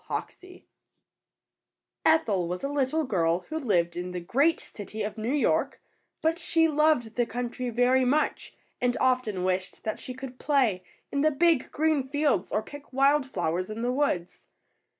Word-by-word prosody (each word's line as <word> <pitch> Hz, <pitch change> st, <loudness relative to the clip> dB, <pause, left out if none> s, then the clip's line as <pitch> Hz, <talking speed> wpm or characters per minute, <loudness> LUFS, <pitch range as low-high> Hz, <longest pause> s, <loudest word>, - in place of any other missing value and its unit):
HOXIE. 365 Hz, 0 st, -7 dB, 1.4 s
Ethel 210 Hz, -, +3 dB
was 180 Hz, +1 st, -4 dB
a -, -, 0 dB
little 285 Hz, +2 st, 0 dB
girl 175 Hz, -, +1 dB
who 315 Hz, 0 st, -2 dB
lived 175 Hz, -, +1 dB
in 180 Hz, +1 st, -4 dB
the 180 Hz, -, -3 dB
great 280 Hz, -, +2 dB
city 215 Hz, +1 st, -7 dB
of 210 Hz, -, -4 dB
New 225 Hz, +2 st, -2 dB
York, 290 Hz, 0 st, +1 dB, 0.4 s
but 325 Hz, +2 st, +1 dB
she 325 Hz, -2 st, +3 dB
loved 300 Hz, -7 st, +2 dB
the 240 Hz, -, +3 dB
country 245 Hz, +1 st, -4 dB
very 245 Hz, +2 st, +3 dB
much 285 Hz, +5 st, 0 dB, 0.3 s
and 245 Hz, 0 st, +1 dB
often 250 Hz, -8 st, +1 dB
wished 185 Hz, 0 st, -2 dB
that 215 Hz, -, -3 dB
she 255 Hz, -, -7 dB
could 255 Hz, -1 st, -9 dB
play 255 Hz, -11 st, +1 dB, 0.3 s
in 280 Hz, -, 0 dB
the 310 Hz, -, +4 dB
big, 315 Hz, -1 st, +2 dB
green 310 Hz, -1 st, +2 dB
fields 285 Hz, -9 st, +1 dB
or 215 Hz, -, 0 dB
pick 290 Hz, 0 st, -12 dB
wild 275 Hz, +1 st, +3 dB
flowers 180 Hz, -4 st, -2 dB
in 220 Hz, +2 st, -5 dB
the 245 Hz, -, +1 dB
woods. 255 Hz, -11 st, -1 dB
255 Hz, 165 wpm, -27 LUFS, 205-290 Hz, 1.4 s, the